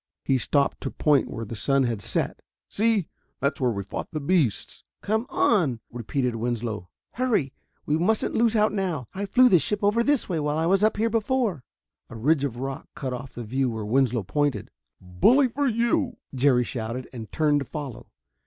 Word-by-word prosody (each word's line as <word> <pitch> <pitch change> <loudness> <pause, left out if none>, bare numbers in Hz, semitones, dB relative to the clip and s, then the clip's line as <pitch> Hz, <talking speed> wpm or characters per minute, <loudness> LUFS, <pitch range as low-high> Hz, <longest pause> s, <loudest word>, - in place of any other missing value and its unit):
He 135 -1 +2
stopped 140 +5 +1
to 135 - -3
point 150 0 +2
where 115 - -5
the 115 - -7
sun 135 +5 +2
had 115 -4 -1
set. - - -1 0.3
"See, 215 -4 +1 0.3
that's 140 0 -1
where 125 - +3
we 100 -4 -3
fought 95 - -5
the 155 - -3
beasts 140 - 0
" - - -64
"Come 220 +4 0
on!" 170 - +2
repeated 120 +1 -2
Winslow. 115 -5 -3 0.2
"Hurry! 225 - 0 0.3
We 150 +2 +1
mustn't 215 +6 +1
lose 230 0 +2
out 215 -1 +3
now. 175 - -2
I 200 +1 -3
flew 255 +6 +6
the 185 -8 +5
ship 205 +8 -2
over 210 +3 +3
this 285 0 +1
way 170 -4 -1
while 150 0 -1
I 160 - +1
was 195 +4 +3
up 215 - +3
here 225 +1 +1
before." 225 - 0 0.5
A 120 - -9
ridge 140 +6 +2
of 125 -4 -2
rock 135 +2 -5
cut 130 -2 -4
off 130 +1 -7
the 120 - -6
view 130 +4 0
where 110 -2 -4
Winslow 120 -1 +1
pointed. 145 +7 -1 0.3
"Bully 100 - +3
for 285 +4 0
you!" 240 +5 +1 0.2
Jerry 130 -1 +3
shouted 120 +1 -5
and 115 -4 -8
turned 150 -2 +2
to 140 - -4
follow. 140 -3 -7
145 Hz, 195 wpm, -25 LUFS, -, 0.5 s, flew